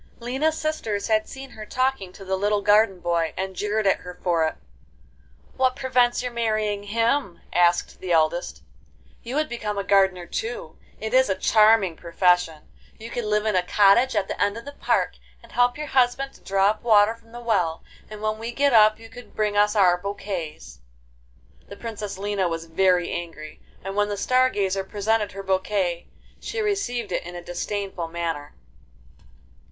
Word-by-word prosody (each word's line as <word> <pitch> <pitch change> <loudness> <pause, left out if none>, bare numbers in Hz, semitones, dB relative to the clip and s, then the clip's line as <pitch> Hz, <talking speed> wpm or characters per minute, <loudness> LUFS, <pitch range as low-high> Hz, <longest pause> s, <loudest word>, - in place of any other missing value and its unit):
XII 235 - -13
Lina's 300 +6 0
sisters 225 -10 -2
had 215 0 +1
seen 270 0 -9
her 215 - -9
talking 255 -5 -1
to 195 - -12
the 190 0 0
little 205 +1 0
garden 205 -2 +4
boy, 170 -2 0
and 190 0 -3
jeered 210 +3 -1
at 195 - +4
her 180 0 -9
for 165 -3 +2
it. - - -4 1.0
'What 260 -1 +2
prevents 250 -2 +1
your 250 - -3
marrying 215 -3 -1
him?' 230 0 0
asked 175 0 +2
the 185 - -5
eldest, 165 +1 +1 0.6
'you 245 +3 -6
would 310 +1 +1
become 215 -5 -4
a 200 - -1
gardener 190 -3 +2
too; 220 -6 -5 0.2
it 220 +2 -4
is 260 -2 +4
a 190 - +1
charming 215 -2 +4
profession. 170 -2 +1 0.3
You 225 +1 -9
could 240 - -3
live 210 0 +1
in 215 -3 +1
a 185 - +4
cottage 205 +7 +4
at 200 -2 +1
the - - -5
end 205 +2 +1
of 230 - -9
the 285 - -7
park, - - 0 0.3
and - - -16
help 245 +1 +2
your 300 - -4
husband 265 0 +1
to - - -19
draw 195 +1 +2
up 215 - -8
water 215 -2 +5
from 230 0 -21
the 240 - -8
well, 185 -9 0 0.3
and 215 0 -9
when 215 0 -1
we 230 +1 -4
get 280 +2 +2
up 215 -1 +6
you 225 - -12
could 240 +2 -13
bring 210 -1 0
us 210 +1 +3
our 180 -3 +4
bouquets.' 180 - -6 0.9
The 200 - -10
Princess 210 -4 -6
Lina 200 -1 -1
was 165 -1 -4
very 180 +1 +2
angry, 160 -3 -7 0.2
and 195 +1 -5
when 205 0 +1
the 205 - -3
Star 255 +4 +3
Gazer 195 -3 -1
presented 210 +2 -1
her 195 0 -7
bouquet, 190 -2 -1 0.3
she 460 - -5
received 390 - -1
it - - -1
in 175 +1 -9
a 175 - -7
disdainful 190 0 -4
manner. 165 -3 -4
205 Hz, 185 wpm, -24 LUFS, 185-230 Hz, 1.0 s, up